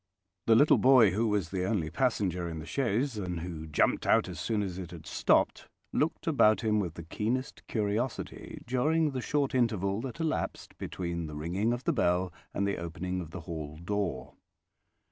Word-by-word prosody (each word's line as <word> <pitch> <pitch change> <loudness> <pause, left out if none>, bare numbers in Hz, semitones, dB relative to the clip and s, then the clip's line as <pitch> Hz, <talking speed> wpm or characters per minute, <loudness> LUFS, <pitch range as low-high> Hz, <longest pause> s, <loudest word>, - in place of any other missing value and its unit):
The 115 - +7
little 145 +7 +6
boy 125 -6 +7
who 110 +5 +1
was 105 -6 0
the 95 -1 -1
only 95 -7 -1
passenger 95 -9 0
in 80 - -5
the 80 - -6
chaise, 120 0 0
and 90 -3 -3
who 80 -2 -6
jumped 75 - +1
out - - +4
as - - -7
soon 110 -3 0
as 95 -2 -4
it 90 -3 -6
had 80 -2 -10
stopped, - - +2 0.3
looked - - 0
about 105 0 +4
him 105 -2 +2
with 85 -5 -3
the 85 - -7
keenest 115 - -2
curiosity 110 +3 -3
during 150 +5 +2
the 130 -2 -3
short 140 +1 0
interval 110 -5 +1
that 130 +4 -6
elapsed 160 -1 -2
between 85 -2 -3
the 75 - -7
ringing 90 +9 0
of 120 +1 -2
the 170 - +1
bell 90 - +1 0.2
and 100 - -1
the 100 - -1
opening 90 +2 -3
of 85 - -7
the 95 +1 -7
hall 80 -3 -6
door. 85 -6 -3
100 Hz, 185 wpm, -30 LUFS, 85-120 Hz, 0.3 s, The